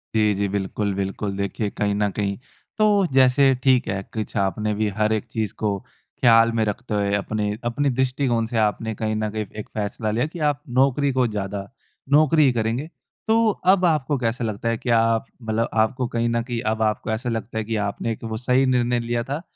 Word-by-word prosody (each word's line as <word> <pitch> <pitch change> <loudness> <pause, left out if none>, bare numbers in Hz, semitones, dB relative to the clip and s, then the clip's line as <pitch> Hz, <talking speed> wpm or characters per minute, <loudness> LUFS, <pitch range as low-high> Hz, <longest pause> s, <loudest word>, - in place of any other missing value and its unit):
जी, 105 -1 +3
जी, 100 +1 -1
बिल्कुल, 100 +1 -2
बिल्कुल 100 +1 -3
देखिए 100 +1 -2
कहीं 100 0 -1
न 105 0 +1
कहीं 100 -1 -2 0.4
तो 205 -3 +4
जैसे 135 +1 +5
ठीक 130 -2 +3
है, 95 -1 -2
कुछ 110 -2 -4
आपने 105 +2 0
भी 105 +1 0
हर 110 0 +2
एक 110 +2 -1
चीज़ 110 -3 -2
को 105 -2 0 0.4
ख़्याल 115 -1 +6
में 115 -1 +1
रखते 105 +2 -4
हुए 100 -1 0
अपने-अपने 110 +6 -1
दृष्टिकोण 130 -3 +1
से 115 0 -3
आपने 110 +1 0
कहीं 110 0 -2
न 110 0 -1
कहीं 110 -1 -3
एक - - -7
फ़ैसला 105 +1 -2
लिया 120 +6 +1
कि 165 +2 -9
आप 145 0 -3 0.2
नौकरी 135 +1 +3
को 130 -1 +2
ज़्यादा 100 -1 -4 0.4
नौकरी 155 +1 +5
ही 130 - +4
करेंगे। 115 +7 -1 0.4
तो 225 0 +4 0.2
अब 185 -2 +2
आपको 150 -3 +1
कैसा 120 0 -1
लगता 110 +1 -2
है 115 - 0
कि 125 - -5
आप 115 +1 +3 0.2
मतलब 110 +1 -1
आपको 115 +3 +1
कहीं 115 0 -1
न 115 0 +1
कहीं 120 -2 -4
अब 110 0 -3
आपको 110 0 0
ऐसा 120 +3 -2
लगता 115 0 -4
है 110 - 0
कि 110 +1 -3
आपने 110 +2 -3
वो 110 -1 -4
सही 125 +2 +2
निर्णय 125 -1 +2
लिया 120 0 -2
था 140 +6 -4
115 Hz, 205 wpm, -23 LUFS, 105-125 Hz, 0.4 s, ख़्याल